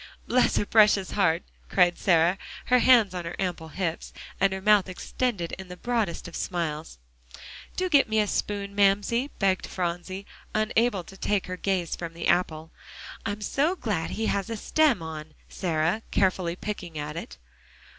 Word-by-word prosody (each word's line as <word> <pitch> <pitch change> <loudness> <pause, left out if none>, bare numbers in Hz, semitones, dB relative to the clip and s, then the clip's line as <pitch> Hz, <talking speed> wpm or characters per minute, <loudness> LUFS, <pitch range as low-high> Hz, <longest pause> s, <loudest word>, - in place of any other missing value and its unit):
"Bless 250 0 +3
her - - +1
precious 210 -3 +4
heart!" 175 -4 +2 0.3
cried 175 -2 +4
Sarah, 175 +1 +3 0.3
her 250 0 +4
hands 235 -7 +5
on 180 -1 -4
her 170 +1 -5
ample 175 -4 -3
hips, 170 0 -3 0.3
and 195 +1 +3
her 190 - -3
mouth 205 -1 +4
extended 185 -1 -2
in 190 - -8
the 180 0 -9
broadest 225 -7 -1
of 170 - -9
smiles. 160 - -3 0.8
"Do 370 - +1
get 285 -9 +4
me 220 0 +2
a 210 - +3
spoon, 200 -1 -2
Mamsie," 205 +6 +2
begged 190 -2 +1
Phronsie, 180 +2 -4 0.3
unable 215 -2 +1
to 195 - -13
take 205 0 0
her 185 - -4
gaze 185 -2 -1
from 170 -1 -6
the 170 - -3
apple. 160 -2 +1 0.6
"I'm 205 0 -3
so 295 - +1
glad 210 - -2
he 225 - -2
has 200 +1 -1
a 225 - -3
stem 280 - +2
on, 155 -1 -7
Sarah," 170 +3 0
carefully 185 -3 +1
picking 180 -5 -6
at 150 +1 -4
it. 65 - -7
190 Hz, 165 wpm, -26 LUFS, 170-215 Hz, 0.8 s, hands